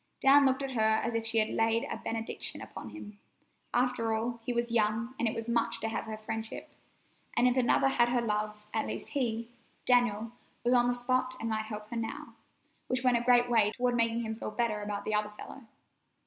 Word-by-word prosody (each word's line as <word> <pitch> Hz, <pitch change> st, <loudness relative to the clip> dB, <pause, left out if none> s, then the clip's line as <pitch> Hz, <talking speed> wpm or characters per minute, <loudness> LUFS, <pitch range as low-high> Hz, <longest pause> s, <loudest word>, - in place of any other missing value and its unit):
Dan 275 Hz, +1 st, +6 dB
looked 265 Hz, +1 st, +1 dB
at 270 Hz, -, -3 dB
her 245 Hz, -, -2 dB
as 220 Hz, +2 st, +2 dB
if 225 Hz, 0 st, -1 dB
she 225 Hz, 0 st, 0 dB
had 215 Hz, -1 st, +3 dB
laid 225 Hz, +1 st, +1 dB
a -, -, -4 dB
benediction 225 Hz, 0 st, -3 dB
upon -, -, -8 dB
him. 210 Hz, -8 st, -10 dB, 0.5 s
After 240 Hz, -2 st, +1 dB
all, 235 Hz, +2 st, -2 dB
he 245 Hz, -, -2 dB
was 235 Hz, 0 st, -1 dB
young, 225 Hz, +2 st, +1 dB
and 235 Hz, -, +2 dB
it 220 Hz, -, -1 dB
was 225 Hz, 0 st, -4 dB
much 235 Hz, -1 st, +1 dB
to 225 Hz, -, -2 dB
have 220 Hz, -, -3 dB
her 220 Hz, -1 st, -5 dB
friendship. 220 Hz, +1 st, -6 dB, 0.7 s
And 245 Hz, +1 st, +5 dB
if 250 Hz, -, +2 dB
another 260 Hz, +1 st, +3 dB
had 240 Hz, -3 st, +3 dB
her 245 Hz, 0 st, +2 dB
love, 210 Hz, -2 st, -2 dB
at 220 Hz, -, 0 dB
least -, -, -5 dB
he, 235 Hz, -4 st, -2 dB, 0.3 s
Daniel, 230 Hz, -3 st, +2 dB, 0.3 s
was 240 Hz, +1 st, +3 dB
on 245 Hz, -1 st, +5 dB
the 245 Hz, -, +1 dB
spot 255 Hz, +1 st, 0 dB
and 225 Hz, -, -3 dB
might 220 Hz, 0 st, -1 dB
help 210 Hz, -1 st, -6 dB
her 235 Hz, -, -3 dB
now, 225 Hz, -1 st, -5 dB, 0.5 s
which 255 Hz, 0 st, -1 dB
went 250 Hz, -2 st, +4 dB
a -, -, -1 dB
great 245 Hz, 0 st, +5 dB
way 220 Hz, -3 st, +3 dB
toward 245 Hz, 0 st, +1 dB
making 230 Hz, 0 st, +1 dB
him 220 Hz, -1 st, -3 dB
feel 220 Hz, -, -5 dB
better 215 Hz, -1 st, -1 dB
about 205 Hz, -1 st, -4 dB
the 215 Hz, -, -1 dB
other 210 Hz, 0 st, +1 dB
fellow. 230 Hz, +4 st, -11 dB
230 Hz, 220 wpm, -30 LUFS, 220-245 Hz, 0.7 s, Dan